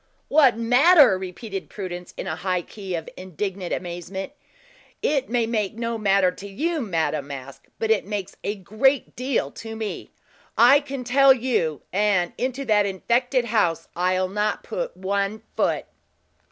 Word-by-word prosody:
"What 275 -6 +5
matter?" 255 - +6
repeated 190 +2 -6
Prudence, 180 -3 -6
in - - -4
a 160 - -2
high 180 0 -1
key 195 -2 -6
of 165 -1 -5
indignant 185 0 -5
amazement. 180 +4 -5 0.7
"It 275 -3 +1
may 235 -1 +1
make 215 -3 -1
no 230 0 -2
matter 195 -3 +3
to 195 +2 -10
you, 310 - -2
Madame 160 - -1
Masque, 140 -1 -9
but 225 -1 0
it 220 - +3
makes 205 -2 -5
a 205 - -2
great 215 +8 +1
deal 250 - -1
to 225 0 -8
me; 220 -2 -5 0.5
I 250 +5 +7
can 275 -3 -6
tell 270 +2 +6
you; 230 - -1
and 195 -3 +2
into 260 +2 -2
that 210 -3 +3
infected 240 +6 +1
house 210 -8 +1
I'll 185 +1 +1
not 210 +3 -1
put - - -4
one 200 +3 -2
foot." - - 0
210 Hz, 155 wpm, -24 LUFS, 185-245 Hz, 0.7 s, I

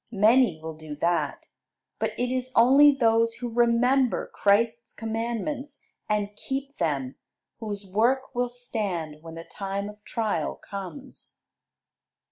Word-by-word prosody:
Many 215 -3 +4
will 160 0 -6
do 155 -1 -8
that; 170 +3 -1 0.5
but - - -1
it 245 0 -1
is 255 0 -2
only 275 +5 +7
those 230 -3 +2
who 240 -2 -5
remember 245 +2 +2
Christ's 230 +3 +2
commandments 235 +6 -4 0.3
and 205 -1 -1
keep 275 +4 -5
them, 140 -6 -1 0.4
whose 205 -2 -5
work 235 +9 +1
will 245 0 0
stand 195 -11 -4
when 165 0 -10
the 165 - -7
time 200 +2 -4
of 210 0 -14
trial 220 -2 -1
comes. 200 +8 -9
225 Hz, 125 wpm, -26 LUFS, 195-245 Hz, 0.5 s, only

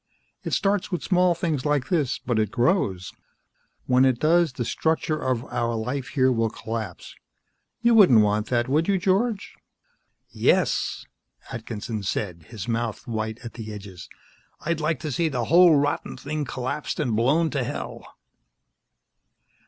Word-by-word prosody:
It - - -4
starts 200 0 +1
with 180 - -2
small 180 -2 +3
things 160 -6 -1
like 145 -3 0
this, 150 -7 +1
but 120 -3 -1
it 105 -2 +1
grows. 120 - 0 0.7
When 125 0 +4
it 130 -2 +3
does, 165 0 +3
the 120 -2 -3
structure 160 +3 0
of 130 -1 -1
our 120 -1 0
life 125 +4 -3
here 130 -2 +2
will 115 -2 +1
collapse. 110 -5 -6 0.7
You 235 0 +4
wouldn't 180 - +7
want 105 +1 +1
that, 120 -1 0
would 150 +5 +1
you, 200 -1 +3
George?" 200 +4 0 0.8
"Yes!" - - +1 0.5
Atkinson 110 -1 -5
said, 90 -4 -3
his 105 -5 -7
mouth 115 -1 -2
white 110 -1 -4
at 115 - -7
the 110 -2 -7
edges. 100 -4 -9 0.5
"I'd 170 -1 -1
like 155 +1 0
to 155 - -3
see 165 +4 +1
the 125 -5 -2
whole 170 +3 +6
rotten 145 +1 -1
thing 150 +1 -3
collapsed 130 +4 -4
and 125 -8 0
blown 150 +9 +2
to 140 -4 -1
hell!" 120 - -5
130 Hz, 155 wpm, -24 LUFS, 115-160 Hz, 0.8 s, wouldn't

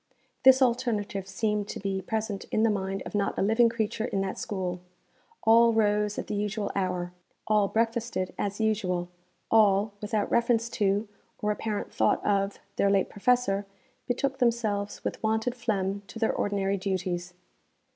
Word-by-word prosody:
This 265 0 +7
alternative 225 -6 0
seemed 210 +1 -1
to - - -5
be 195 -1 -2
present 220 -1 -3
in 220 - 0
the 225 - +4
mind 195 -1 -2
of - - -7
not 200 -1 0
a - - +1
living 225 +3 +4
creature 225 -1 -2
in 195 -4 -1
that 195 -1 -3
school. 180 -3 -3 0.6
All 230 +1 +6
rose 210 -1 +2
at - - -3
the - - -5
usual 210 0 -2
hour; 180 -2 -1 0.3
all 210 -2 +3
breakfasted 230 -4 -1
as 200 +1 -3
usual; 185 -5 0 0.4
all, 210 -1 +4
without 210 -1 -1
reference 235 -1 +2
to, 205 +1 +1 0.3
or 210 - 0
apparent 210 0 -3
thought - - +1
of, 200 -1 +1 0.2
their 200 - +3
late 195 -1 +2
professor, 205 -3 +1 0.4
betook 265 +2 -1
themselves 220 -4 0
with - - -3
wonted 220 +2 0
phlegm 200 -5 -1
to 180 - -9
their 225 -1 +1
ordinary 200 -1 0
duties. 180 -2 -3
210 Hz, 155 wpm, -28 LUFS, 195-225 Hz, 0.6 s, This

